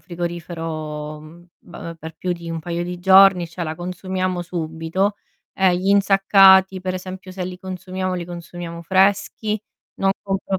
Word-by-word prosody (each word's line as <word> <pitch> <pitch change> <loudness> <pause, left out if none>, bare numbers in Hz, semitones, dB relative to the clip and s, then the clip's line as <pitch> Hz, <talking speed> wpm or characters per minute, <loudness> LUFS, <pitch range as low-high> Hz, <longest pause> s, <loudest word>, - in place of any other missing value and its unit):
frigorifero, 165 -3 -5
mhmm, 170 +3 -15
b 165 0 -9
per 160 0 -9
più 180 -1 -2
di 170 -1 -8
un 165 -1 -3
paio 170 +1 -3
di 180 0 -5
giorni, 190 -1 +6
cioè, 170 +1 -5
la 155 0 -3
consumiamo 185 +1 -3
subito, 170 +4 -2 0.4
e 185 -2 +3
gli 190 +2 -2
insaccati, 195 -1 +6
per 185 0 -3
esempi, 185 +1 -7
se 185 -1 -4
li 180 0 -6
consumiamo, 185 0 -4
li 175 -1 -3
consumiamo 170 -1 -8
freschi, 200 +3 +1 0.3
non 195 0 +1
compro 195 -1 -2
180 Hz, 155 wpm, -21 LUFS, 170-190 Hz, 0.4 s, giorni